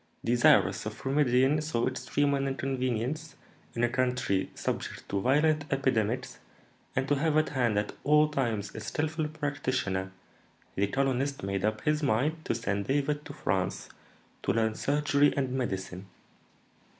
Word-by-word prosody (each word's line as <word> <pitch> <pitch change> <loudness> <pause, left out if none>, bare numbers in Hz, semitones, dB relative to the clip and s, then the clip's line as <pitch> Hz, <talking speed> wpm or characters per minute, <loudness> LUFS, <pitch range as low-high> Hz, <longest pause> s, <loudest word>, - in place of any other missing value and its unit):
Desirous 120 +1 +4
of - - -8
remedying 135 +1 +3
so 150 -6 0
extreme 130 +2 0
an 140 0 0
inconvenience 135 +2 -2 0.4
in 115 - 0
a - - +5
country 125 -6 0
subject - - -4
to 100 - -1
violent 150 +5 +3
epidemics, 130 -2 0 0.6
and 135 +1 0
to 145 - +2
have 150 +2 +1
at 155 - +2
hand 120 -6 +1
at 105 0 -1
all 150 +1 +5
times 120 -8 -2
a - - -6
skilful 155 +7 -2
practitioner, 130 -11 -2 0.6
the 100 +1 +1
colonist 135 +1 0
made 100 -1 -2
up 110 0 0
his 150 0 +1
mind 145 +5 +1
to - - -1
send 100 -3 -2
David 145 +2 0
to 145 - -8
France 95 -8 -2 0.5
to - - 0
learn 110 -1 +1
surgery 145 +3 +2
and 135 -2 0
medicine. 95 -7 -3
130 Hz, 145 wpm, -29 LUFS, 110-145 Hz, 0.6 s, a